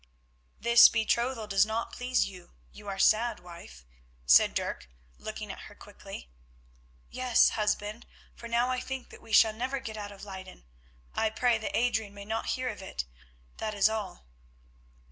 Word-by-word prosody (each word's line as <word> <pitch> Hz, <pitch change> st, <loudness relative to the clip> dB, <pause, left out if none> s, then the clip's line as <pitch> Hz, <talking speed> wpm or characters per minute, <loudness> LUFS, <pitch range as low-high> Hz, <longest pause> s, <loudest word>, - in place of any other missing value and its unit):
"This 235 Hz, 0 st, +8 dB
betrothal 235 Hz, +1 st, 0 dB
does 195 Hz, -2 st, +4 dB
not 220 Hz, +2 st, -2 dB
please 250 Hz, 0 st, 0 dB
you; 180 Hz, -3 st, -11 dB, 0.2 s
you 210 Hz, 0 st, -13 dB
are 195 Hz, -1 st, -4 dB
sad, 220 Hz, +3 st, +3 dB
wife," 170 Hz, -, -12 dB, 0.4 s
said -, -, +6 dB
Dirk, -, -, -3 dB, 0.3 s
looking -, -, -6 dB
at -, -, -9 dB
her -, -, -15 dB
quickly. -, -, -11 dB, 0.8 s
"Yes, 255 Hz, -2 st, +4 dB
husband, 210 Hz, +1 st, -2 dB, 0.3 s
for 235 Hz, -, -10 dB
now 235 Hz, +2 st, +1 dB
I 255 Hz, 0 st, 0 dB
think 265 Hz, 0 st, -6 dB
that -, -, -13 dB
we 225 Hz, -, -14 dB
shall 220 Hz, 0 st, +6 dB
never 255 Hz, +5 st, -3 dB
get 220 Hz, -4 st, -7 dB
out 205 Hz, -1 st, -6 dB
of 200 Hz, 0 st, -11 dB
Leyden. 190 Hz, -, -10 dB, 0.5 s
I 220 Hz, -, +1 dB
pray 230 Hz, +1 st, +1 dB
that 220 Hz, -, -2 dB
Adrian 220 Hz, -4 st, 0 dB
may 200 Hz, 0 st, -9 dB
not 225 Hz, +2 st, -3 dB
hear 255 Hz, 0 st, -2 dB
of -, -, -7 dB
it, 65 Hz, -, -5 dB, 0.5 s
that 215 Hz, -1 st, -3 dB
is 205 Hz, +1 st, +4 dB
all." 210 Hz, -, -5 dB
220 Hz, 165 wpm, -29 LUFS, 200-235 Hz, 0.8 s, This